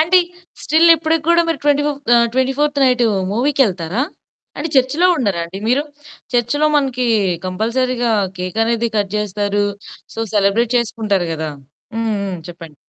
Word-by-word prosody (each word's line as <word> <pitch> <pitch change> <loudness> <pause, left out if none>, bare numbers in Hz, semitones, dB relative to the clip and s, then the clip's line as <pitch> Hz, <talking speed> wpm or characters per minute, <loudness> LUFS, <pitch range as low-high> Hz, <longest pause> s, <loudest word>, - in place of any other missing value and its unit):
అంటే, 345 +4 +5 0.4
స్టిల్ 320 +3 +4
ఇప్పడికి 320 0 0
గూడా 340 0 +5
మీరు 330 - -1
ట్వెంటీ 290 0 +3
ఫిఫ్ 285 -1 -3 0.2
ఆహ్, 235 0 +4
24థ్ 280 +3 0
నైటు 250 -2 +3 0.3
మూవీకెళ్తారా? 230 - 0 0.6
అంటే 315 +3 -2
చర్చులో 280 +8 +3
ఉండరా 200 - -1
అండి 175 +3 -8
మీరు? 270 +4 +2 0.5
చర్చ్‌లో 245 +6 +1
మనకి 255 -3 0 0.4
కంపల్సరీగా 235 +5 -1 0.3
కేక్ 180 +3 -5
అనేది 235 0 0
కట్ 205 -1 -1
జేస్తారు. 205 0 -1 0.5
సో, - - -10 0.2
సెలబ్రేట్ 215 +4 +2
చేసుకుంటారు 215 -6 -1
గదా! 160 -1 -4 0.5
హ్మ్. 225 0 -1 0.2
హ్మ్. 195 -2 -4
చెప్పండి. 165 -3 -11
235 Hz, 140 wpm, -17 LUFS, 205-285 Hz, 0.6 s, అంటే